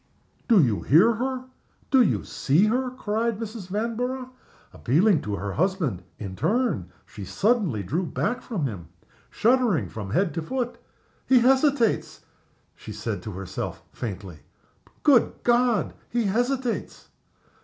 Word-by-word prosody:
"Do 230 -5 +6
you 115 -6 +1
hear 185 - +5
her? 255 +2 -3 0.5
do 265 -2 +6
you 230 - +2
see 150 +9 +2
her?" 250 +4 +1
cried 230 -2 -2
Mrs. 220 -3 -6
Vanborough, 245 +5 -3 0.4
appealing 165 - +3
to 105 -1 -3
her 100 0 -4
husband, 165 - 0 0.2
in 100 - -6
her - - -9
turn. 215 - 0 0.2
She 100 - -10
suddenly 195 - +1
drew 160 - -1
back 245 - -2
from 195 - -3
him, 95 - -5 0.4
shuddering 235 - +2
from 105 -3 -6
head 175 - +1
to 165 - -2
foot. 245 +7 -3 0.5
"He 255 -2 +5
hesitates!" 265 -2 +2 0.5
she - - -10
said 110 0 -4
to 110 -3 -7
herself, 95 0 -5
faintly. 95 -7 -6 0.6
"Good 270 -6 +5
God! 240 -2 +2 0.2
he 240 0 0
hesitates!" 245 +4 -2
210 Hz, 135 wpm, -25 LUFS, -, 0.6 s, Do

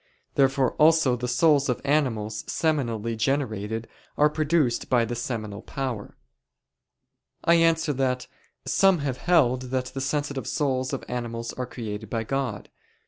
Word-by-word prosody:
Therefore 135 -2 +3
also 155 -4 +5
the 125 0 -4
souls 140 +2 +3
of 125 - 0
animals 115 -8 0
seminally 115 -8 -1
generated 110 -3 -1 0.3
are 150 0 +4
produced 150 -5 +1
by 120 -3 +3
the 120 - -4
seminal 110 -4 -4
power. 130 -6 -5 1.3
I 170 - +5
answer 165 -2 +3
that, 125 -1 0 0.4
Some 195 -2 +4
have 130 -3 -2
held 130 -7 +3
that 130 0 -1
the 135 - -4
sensitive 140 0 -2
souls 130 -3 0
of 135 - -4
animals 115 -1 -4
are 125 -1 -4
created 110 -3 -6
by 115 0 -1
God 125 -4 -2
(Q. - - -26
130 Hz, 140 wpm, -25 LUFS, 115-145 Hz, 1.3 s, also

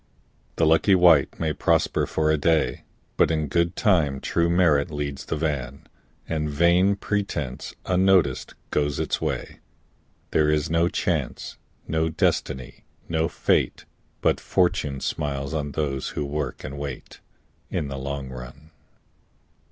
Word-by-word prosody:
The 80 - +2
lucky 80 +5 +4
wight 85 -6 +5
may 80 -2 0
prosper - - +1
for 80 0 +1
a - - +4
day, 80 +1 +1 0.3
But - - +4
in 80 -1 0
good 85 +3 +1
time 80 - +2
true 85 +4 0
merit 85 -5 +3
leads 70 -2 -4
the - - -2
van 70 -4 -3 0.4
And 75 -2 -1
vain 85 +6 +3
pretence, 100 -11 -3
unnoticed, 90 -7 +2 0.2
goes 75 -1 0
its - - -1
way. - - -3 0.7
There 75 -1 +3
is 75 0 +1
no 85 +1 +3
Chance, - - -2 0.3
no 80 0 0
Destiny, 65 -4 -1 0.2
no 80 -1 0
Fate, - - 0 0.4
But - - +2
Fortune 75 -7 0
smiles 70 -1 -3
on 75 -2 -3
those 70 -4 -2
who 75 - 0
work 70 -1 -4
and 70 +2 -6
wait, 70 -3 -7 0.5
In 75 - -2
the 70 -1 -5
long 70 0 -4
run. 65 +5 -10
75 Hz, 135 wpm, -24 LUFS, 70-85 Hz, 0.7 s, wight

